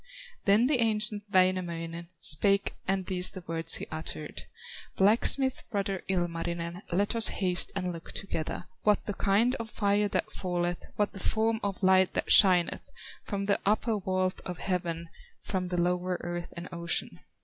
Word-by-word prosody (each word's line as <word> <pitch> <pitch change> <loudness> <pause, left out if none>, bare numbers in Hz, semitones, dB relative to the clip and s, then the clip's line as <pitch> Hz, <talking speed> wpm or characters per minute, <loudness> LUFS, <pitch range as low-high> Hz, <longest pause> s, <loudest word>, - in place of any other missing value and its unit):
Then 210 +3 +4
the 265 -1 +2
ancient 215 -2 0
Wainamoinen 170 -3 0
Spake 200 +6 +2
and 190 -1 0
these 180 0 -1
the 185 -3 -10
words 165 0 0
he - - -2
uttered: 155 -1 -6 0.5
"Blacksmith 235 +6 +4
brother, 195 -4 -2
Ilmarinen, 170 -1 -2
Let 200 +6 +1
us 225 -2 +6
haste 185 -2 +2
and 180 -2 -1
look 165 -1 -8
together, 165 -5 -4 0.2
What 210 -1 +2
the 205 - -3
kind 210 +6 +2
of 230 -1 -5
fire 205 -1 +1
that 215 +1 -2
falleth, 175 -2 -2
What 205 -1 0
the 195 - -9
form 220 +3 0
of 200 -1 -3
light 190 0 +4
that - - -2
shineth 180 -4 +5 0.4
From 200 -1 -3
the 200 0 +1
upper 215 +1 +1
vault 185 -1 -1
of 180 -2 -6
heaven, 170 -3 -3 0.3
From 185 -2 -3
the 180 -1 -2
lower 180 +1 0
earth 175 0 -5
and 170 +1 -6
ocean. 170 - -2
185 Hz, 160 wpm, -29 LUFS, 175-205 Hz, 0.5 s, us